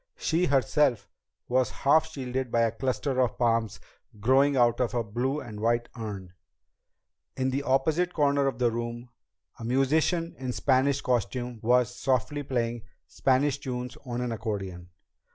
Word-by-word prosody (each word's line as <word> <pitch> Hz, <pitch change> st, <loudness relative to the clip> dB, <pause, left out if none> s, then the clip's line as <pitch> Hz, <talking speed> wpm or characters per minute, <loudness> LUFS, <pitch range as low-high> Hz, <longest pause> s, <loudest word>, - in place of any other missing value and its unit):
She 165 Hz, +3 st, +1 dB
herself 135 Hz, -3 st, +2 dB, 0.4 s
was 130 Hz, 0 st, +2 dB, 0.2 s
half 155 Hz, +3 st, +5 dB
shielded 130 Hz, -4 st, -4 dB
by 115 Hz, -, +2 dB
a 115 Hz, -1 st, +2 dB
cluster 130 Hz, +3 st, -1 dB
of 125 Hz, -3 st, 0 dB
palms 115 Hz, -3 st, +1 dB, 0.4 s
growing 135 Hz, +5 st, +3 dB
out 120 Hz, -1 st, +3 dB
of 125 Hz, 0 st, -1 dB
a 120 Hz, -, +1 dB
blue 125 Hz, +7 st, -2 dB
and 105 Hz, -7 st, -8 dB
white 120 Hz, +2 st, +1 dB
urn. 100 Hz, -6 st, -6 dB, 1.0 s
In 130 Hz, 0 st, 0 dB
the 135 Hz, +2 st, -1 dB
opposite 150 Hz, +6 st, +1 dB
corner 140 Hz, -3 st, +2 dB
of 135 Hz, -, -2 dB
the 120 Hz, -2 st, +2 dB
room, 120 Hz, +1 st, -5 dB, 0.5 s
a -, -, -7 dB
musician 155 Hz, +7 st, +1 dB
in 130 Hz, -1 st, -4 dB
a -, -, -1 dB
Spanish 135 Hz, +1 st, +2 dB
costume 120 Hz, 0 st, -1 dB
was 125 Hz, +1 st, +2 dB
softly 135 Hz, +3 st, 0 dB
playing 120 Hz, -4 st, -2 dB, 0.2 s
Spanish 135 Hz, +1 st, +1 dB
tunes 125 Hz, -1 st, -5 dB
on 125 Hz, -2 st, -4 dB
an 125 Hz, -1 st, -2 dB
accordion. 95 Hz, -5 st, -5 dB
125 Hz, 155 wpm, -27 LUFS, 115-135 Hz, 1.0 s, half